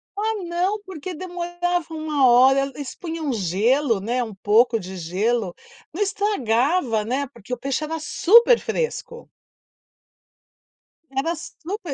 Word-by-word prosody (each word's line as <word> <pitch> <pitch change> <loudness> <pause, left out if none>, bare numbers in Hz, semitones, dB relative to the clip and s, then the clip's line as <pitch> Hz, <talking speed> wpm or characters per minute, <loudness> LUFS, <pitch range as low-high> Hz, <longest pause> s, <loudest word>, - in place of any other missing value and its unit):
Ah, 425 -1 -2
não. 355 +4 -1
Porque 370 -2 -7
demorava 350 -1 -3
1 305 -4 +2
hora. 255 +3 +6 0.2
Eles 280 -3 -7
punham 325 -5 -4
gelo, 225 - +1
né. 240 +5 -1
Um 220 -2 -7
pouco 225 +4 +3
de 190 -1 -8
gelo. 190 +3 -1 0.4
Não 365 - -4
estragava, 285 - +1
né, 265 +5 -1
porque 250 -2 -9
o - - -2
peixe 275 +4 -2
era 320 +1 -3
super 465 +10 +5
fresco. 480 0 -4 1.8
Era 275 +5 -1
super 340 +1 -7
290 Hz, 125 wpm, -22 LUFS, 235-355 Hz, 1.8 s, hora